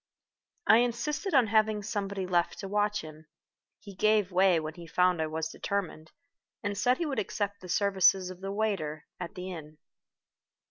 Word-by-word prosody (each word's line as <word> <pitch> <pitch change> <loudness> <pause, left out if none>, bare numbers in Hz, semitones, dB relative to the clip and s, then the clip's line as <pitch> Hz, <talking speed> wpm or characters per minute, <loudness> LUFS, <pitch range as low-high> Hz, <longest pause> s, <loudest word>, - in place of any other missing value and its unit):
I 220 - +7
insisted 280 - 0
on 255 -3 +6
having 215 -1 +2
somebody 200 -2 -3
left 175 -2 +1
to 195 - -6
watch 210 +1 0
him. 155 0 -12 0.5
He 200 -2 -11
gave 210 -1 +2
way 185 -1 +4
when 155 0 -5
he 170 0 -11
found 180 0 +2
I 160 - 0
was 160 +1 -3
determined, 180 -5 -4 0.5
and 205 0 -2
said 245 +6 +2
he 340 - -1
would 285 -3 -1
accept 205 0 -3
the 180 - -10
services 190 -1 +3
of 185 0 -12
the 195 0 -4
waiter 195 -8 -2
at 175 -2 -6
the 185 0 -6
inn. 155 -3 -9
195 Hz, 175 wpm, -29 LUFS, 175-210 Hz, 0.5 s, I